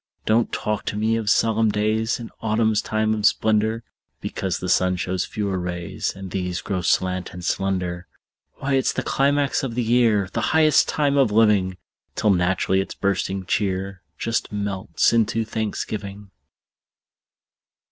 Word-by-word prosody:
Don't 115 +2 +2
talk 105 -1 -2
to - - -2
me 110 +2 +1
of 110 -2 -1
solemn 110 0 +3
days 110 +3 0
In 115 - -8
autumn's 110 -1 +1
time 110 0 0
of 105 -1 -3
splendor, 110 +1 +2 0.4
Because 95 -3 -3
the 90 - -5
sun 90 0 +2
shows 90 0 -2
fewer 100 -4 -2
rays, 90 0 -4
And 95 -1 -8
these 90 -1 -2
grow 95 -2 -2
slant 90 +1 0
and 90 -1 -7
slender. 90 -2 -2 0.5
Why, 140 0 -2
it's 135 -1 +2
the - - -2
climax 140 0 +1
of 125 -4 -4
the 125 - 0
year, 115 -4 +3
The - - -1 0.2
highest 155 -1 +5
time 145 -2 +1
of 130 -6 +3
living! 105 -4 +3 0.4
Till 105 - +2
naturally 95 +1 +2
its 95 - -6
bursting 95 -1 -1
cheer 95 -1 -1 0.2
Just 115 0 -2
melts 100 -1 0
into 115 0 +1
thanksgiving. 105 -2 -4
105 Hz, 150 wpm, -23 LUFS, 95-115 Hz, 0.5 s, highest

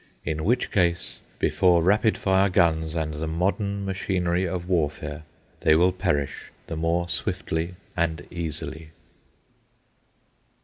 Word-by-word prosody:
In 80 0 -2
which 120 +7 +1
case, 85 -4 0 0.2
before 90 -3 +3
rapid 105 +4 +3
fire 95 +1 +3
guns 80 -3 +2
and 80 -2 -1
the 75 +2 -3
modern 100 +4 -1
machinery 90 -1 0
of 90 0 -4
warfare, 75 -3 -1 0.3
they 80 - +4
will 90 +3 +5
perish 90 -7 -2 0.2
the 80 - -5
more 85 +2 0
swiftly 85 0 -2 0.2
and 85 -1 -1
easily. 80 -2 -4
85 Hz, 120 wpm, -25 LUFS, 80-95 Hz, 0.3 s, will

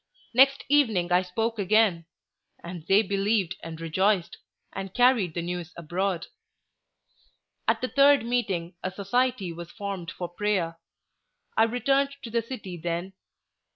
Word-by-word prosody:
Next 270 +3 +5
evening 225 -12 +2
I 180 +1 +5
spoke 225 +5 -2
again, 195 -4 +3 0.6
and 170 -2 -8
they 200 +3 +5
believed 195 -2 0
and 165 -1 -8
rejoiced, 185 +3 0 0.3
and 195 -1 -6
carried 245 -9 +3
the 170 - -2
news 175 -1 -5
abroad. 175 +2 -2 1.4
At - - +2
the 255 - 0
third 280 -1 +5
meeting 200 -8 -1
a 185 - -2
society 200 0 -1
was 170 0 -8
formed 200 -4 -5
for 180 -1 -5
prayer. 175 -3 -1 0.8
I 225 - +5
returned 275 +4 +1
to 230 - -7
the 235 0 +1
city 210 -7 -7
then. 170 +3 -3
195 Hz, 135 wpm, -27 LUFS, 175-230 Hz, 1.4 s, Next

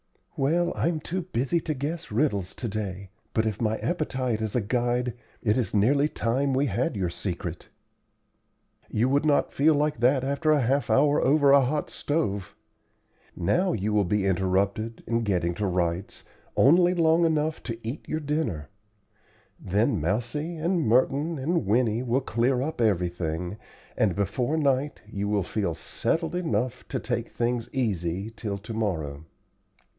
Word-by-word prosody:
"Well, 170 +6 +1
I'm 165 -1 0
too 185 +5 -3
busy 165 -2 0
to 155 -2 -3
guess 155 +3 -4
riddles 105 -6 0
to 120 - -4
day; 100 -3 -5 0.2
but 110 - +2
if 110 -1 -2
my 110 -1 +1
appetite 130 -9 -1
is 110 0 -3
a 125 - +2
guide, 120 +2 0 0.3
it 105 -3 +3
is 115 - -2
nearly 140 +8 +3
time 135 +3 0
we 135 +2 +2
had 155 0 -1
your 90 -4 -1
secret." 85 -2 -5 1.2
"You 115 +4 +1
would 140 +2 +2
not 145 - +2
feel 150 +2 +4
like 150 -2 0
that 130 +2 +3
after 150 +3 +2
half 135 +3 +1
an - - +4
hour 145 +1 +4
over 140 +1 +4
a 140 0 +7
hot 145 +4 -1
stove. 100 - -2 0.8
Now 180 - +1
you 105 +1 -1
will 105 -1 +4
be 100 +2 0
interrupted, 100 +4 0
in 115 0 0
getting 90 -5 0
to 105 +1 -1
rights, 90 0 -2 0.3
only 175 +5 +5
long 165 0 +4
enough 155 -1 +1
to 115 -2 -5
eat 130 +7 -6
your 155 - -1
dinner. 125 - -2 0.9
Then 100 -2 +1
Mousie 120 - -2
and 170 +2 +1
Merton 140 +6 +2
and 145 - 0
Winnie 115 +1 +2
will 125 +2 +1
clear 125 +1 +1
up 155 -3 -3
everything, 90 -3 -1 0.4
and 100 -5 +2
be 100 0 +1
fore 125 +10 -1
night 140 -1 0
you 100 -1 -4
will 105 -2 +1
feel 95 -3 -2
settled 165 - -2
enough 125 - -2
to - - -2
take 120 -2 -3
things 120 0 -1
easy 95 -5 -1
till 105 -3 -4
to 105 +3 -8
morrow." 80 -9 -2
120 Hz, 160 wpm, -26 LUFS, 100-145 Hz, 1.2 s, a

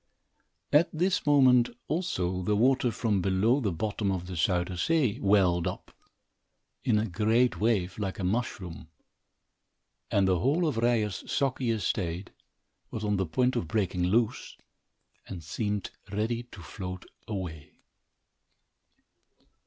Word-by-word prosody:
At 150 +3 +5
this 180 +1 0
moment, 130 -4 +5 0.2
also, 95 - -1
the 105 +3 +1
water, 125 +3 +3
from 110 -3 0
below 100 +8 +2
the 105 -8 0
bottom 100 +3 -2
of 90 -2 -3
the 90 - -7
Zuyder 90 +1 0
Zee, 130 - +1
welled 95 -4 +3
up, - - -6 0.9
in 105 - +2
a 105 - +1
great 110 +5 +1
wave, 100 -4 0
like 95 -2 -3
a 95 - -4
mushroom, 90 -5 -3 1.2
and 100 -1 +2
the 90 -2 +2
whole 155 - +2
of 140 -7 -1
Ryer's 115 -4 0
soggy 135 -3 0
estate 95 -5 -2 0.6
was 110 - -5
on 105 -1 +1
the 95 -2 -1
point 125 +11 +1
of 85 - -1
breaking 90 -3 0
loose 115 +5 0 0.7
and 90 -4 -7
seemed 105 +5 -3 0.2
ready 110 +4 -1
to 90 - -11
float 90 +3 -7 0.2
away. 90 -8 -6
105 Hz, 130 wpm, -28 LUFS, 90-120 Hz, 1.2 s, At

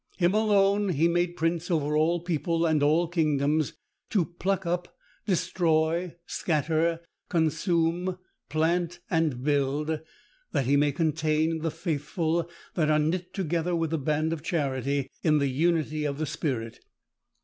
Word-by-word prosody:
_Him 175 +1 +3
alone 205 -1 +3
he 165 -1 +3
made 175 0 0
prince 165 +2 -1
over 150 -3 +1
all 165 +3 +2
people, 170 0 0
and 155 -2 +2
all 155 +4 +3
kingdoms, 155 -3 +1 0.4
to 190 -6 +2
pluck 190 +2 -2
up, 175 +1 -3 0.3
destroy, 170 -2 +1
scatter, 165 +1 0 0.3
consume, 170 +2 +1 0.3
plant, 170 +2 0
and 155 -7 +1
build, 145 +2 0 0.5
that 135 - +1
he 140 +3 +3
may 145 0 +3
contain 155 +1 +1
the 165 +1 -1
faithful 165 +1 -2 0.2
that 155 -4 +1
are 155 - +4
knit 170 +4 -1
together 175 -2 -1
with 165 -2 -1
the 160 - 0
band 155 +3 0
of 160 - -5
charity, 140 -4 -1
in 155 -2 +3
the 140 -2 +1
unity 155 +1 +1
of 140 -1 -2
the 155 - -1
Spirit. 120 -7 -3
160 Hz, 140 wpm, -27 LUFS, 150-175 Hz, 0.5 s, are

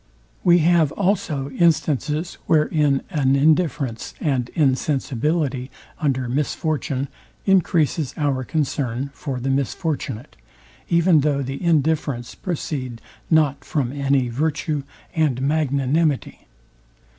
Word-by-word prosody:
We 175 -1 +6
have 170 -4 +4
also 180 -8 -1
instances, 155 +1 +1
wherein 150 -3 +2
an 140 -5 +2
indifference 145 -5 +1
and 130 -5 0
insensibility 140 -1 0 0.3
under 130 -4 0
misfortune 140 0 -1 0.4
encreases 165 -6 +2
our 140 -3 0
concern 140 -3 -2
for 135 -4 -4
the 135 +2 -1
misfortunate, 140 - -2 0.5
even 170 -1 +4
though 140 -1 +1
the 135 +5 -5
indifference 150 -6 +1
proceed 135 -8 -4 0.3
not 145 -3 +3
from 135 -6 -1
any 140 -2 +1
virtue 150 +3 -1 0.3
and 150 -6 +1
magnanimity. 140 +1 0
145 Hz, 100 wpm, -22 LUFS, 135-160 Hz, 0.5 s, We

